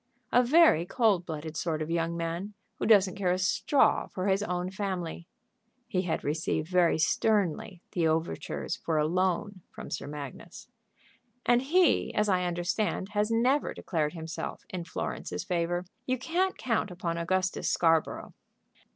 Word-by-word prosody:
"A 245 Hz, -, +6 dB
very 265 Hz, -, +5 dB
cold 195 Hz, -2 st, +1 dB
blooded 160 Hz, -1 st, -5 dB
sort 160 Hz, -1 st, -1 dB
of 155 Hz, +1 st, -3 dB
young 170 Hz, 0 st, 0 dB
man, 170 Hz, +5 st, -4 dB, 0.2 s
who -, -, -1 dB
doesn't 200 Hz, -4 st, +5 dB
care 185 Hz, -3 st, +1 dB
a 180 Hz, -, +1 dB
straw 190 Hz, +9 st, +2 dB
for 185 Hz, -, -4 dB
his 195 Hz, 0 st, +2 dB
own 180 Hz, -2 st, -2 dB
family." 185 Hz, -4 st, -4 dB, 0.6 s
He 190 Hz, -6 st, 0 dB
had 175 Hz, -3 st, -2 dB
received 155 Hz, +1 st, -1 dB
very 180 Hz, -3 st, +3 dB
sternly 185 Hz, +1 st, 0 dB
the 170 Hz, -3 st, +1 dB
overtures 160 Hz, +1 st, -2 dB
for 160 Hz, -2 st, -2 dB
a 150 Hz, -, +3 dB
loan 185 Hz, +3 st, 0 dB
from -, -, -10 dB
Sir 140 Hz, -, -4 dB
Magnus. 145 Hz, +3 st, -8 dB, 0.8 s
"And 245 Hz, 0 st, +4 dB
he, 320 Hz, -2 st, +3 dB
as 210 Hz, -1 st, +2 dB
I 180 Hz, -1 st, +2 dB
understand, 180 Hz, +3 st, -1 dB
has 210 Hz, +1 st, 0 dB
never 250 Hz, +6 st, +2 dB
declared 155 Hz, -3 st, -1 dB
himself 165 Hz, -1 st, -6 dB
in 180 Hz, -2 st, -4 dB
Florence's 90 Hz, -, -4 dB
favor. 175 Hz, +1 st, -1 dB, 0.2 s
You 255 Hz, 0 st, +1 dB
can't 350 Hz, +8 st, 0 dB
count 230 Hz, -4 st, 0 dB
upon 170 Hz, -2 st, -3 dB
Augustus 185 Hz, +2 st, 0 dB
Scarborough." 165 Hz, -2 st, +1 dB
180 Hz, 150 wpm, -29 LUFS, 165-210 Hz, 0.8 s, A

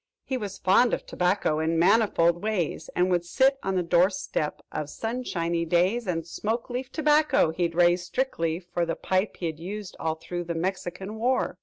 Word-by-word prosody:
"He 265 Hz, -, -3 dB
was 205 Hz, -5 st, -4 dB
fond 210 Hz, +6 st, +4 dB
of -, -, -11 dB
tobacco 180 Hz, -4 st, 0 dB
in 160 Hz, +1 st, 0 dB
manifold 175 Hz, -2 st, +3 dB
ways, 205 Hz, -7 st, -2 dB
And 180 Hz, +1 st, +2 dB
would 175 Hz, -1 st, +2 dB
sit 265 Hz, +9 st, +2 dB
on 195 Hz, 0 st, -2 dB
the 180 Hz, -, +1 dB
door 175 Hz, +2 st, +4 dB
step, 185 Hz, -5 st, -3 dB
of 150 Hz, -1 st, -4 dB
sunshiny 175 Hz, -7 st, -2 dB
days, 180 Hz, +7 st, +1 dB
"And 165 Hz, -3 st, -1 dB
smoke 225 Hz, +8 st, -3 dB
leaf 255 Hz, +1 st, -4 dB
tobacco 300 Hz, -, +3 dB
he'd 170 Hz, 0 st, -1 dB
raised 175 Hz, 0 st, +3 dB
strictly 170 Hz, -11 st, -1 dB
for 175 Hz, -1 st, -3 dB
The 165 Hz, -1 st, -1 dB
pipe 190 Hz, +2 st, -1 dB
he'd 160 Hz, -3 st, -4 dB
used 195 Hz, +3 st, -6 dB
all 160 Hz, 0 st, -1 dB
through 175 Hz, +2 st, -5 dB
The 170 Hz, 0 st, -3 dB
Mexican 190 Hz, +4 st, -4 dB
War." 255 Hz, +3 st, 0 dB
180 Hz, 180 wpm, -26 LUFS, 170-220 Hz, -, fond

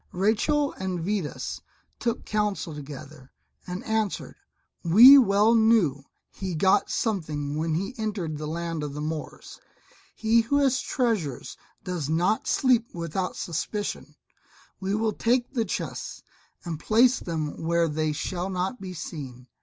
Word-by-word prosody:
Rachel 225 Hz, +10 st, +1 dB
and 185 Hz, -2 st, -2 dB
Vidas 185 Hz, -2 st, -3 dB, 0.4 s
took 235 Hz, -1 st, -2 dB
counsel 210 Hz, -5 st, -1 dB
together 145 Hz, -1 st, -10 dB, 0.4 s
and 180 Hz, +5 st, -5 dB
answered, 220 Hz, -3 st, -2 dB, 0.5 s
"We 235 Hz, +11 st, +9 dB
well 210 Hz, -1 st, +4 dB
knew 220 Hz, -, +3 dB, 0.3 s
he 185 Hz, -3 st, -5 dB
got 190 Hz, +4 st, +3 dB
something 155 Hz, -9 st, -2 dB
when 160 Hz, +1 st, -1 dB
he 195 Hz, +9 st, -2 dB
entered 190 Hz, -9 st, -3 dB
the 150 Hz, -, -4 dB
land 165 Hz, 0 st, -3 dB
of 145 Hz, -1 st, -5 dB
the -, -, -5 dB
Moors; 155 Hz, 0 st, -6 dB, 0.6 s
he 225 Hz, +1 st, +3 dB
who 235 Hz, +6 st, 0 dB
has 270 Hz, -2 st, +2 dB
treasures 210 Hz, -, -2 dB, 0.3 s
does 175 Hz, -6 st, -3 dB
not 175 Hz, +7 st, +1 dB
sleep 245 Hz, -3 st, +3 dB
without 170 Hz, +2 st, -3 dB
suspicion; 205 Hz, +5 st, -4 dB, 0.6 s
we 195 Hz, +1 st, -1 dB
will 220 Hz, 0 st, 0 dB
take 245 Hz, +2 st, 0 dB
the 230 Hz, -4 st, 0 dB
chests, 185 Hz, -, -5 dB, 0.4 s
and 165 Hz, -3 st, -4 dB
place 240 Hz, +7 st, +4 dB
them 155 Hz, -3 st, -4 dB
where 170 Hz, +1 st, +2 dB
they 155 Hz, 0 st, -1 dB
shall 175 Hz, +5 st, -3 dB
not 190 Hz, +5 st, -3 dB
be 185 Hz, -2 st, -7 dB
seen. 135 Hz, -7 st, -7 dB
185 Hz, 140 wpm, -26 LUFS, 155-220 Hz, 0.6 s, We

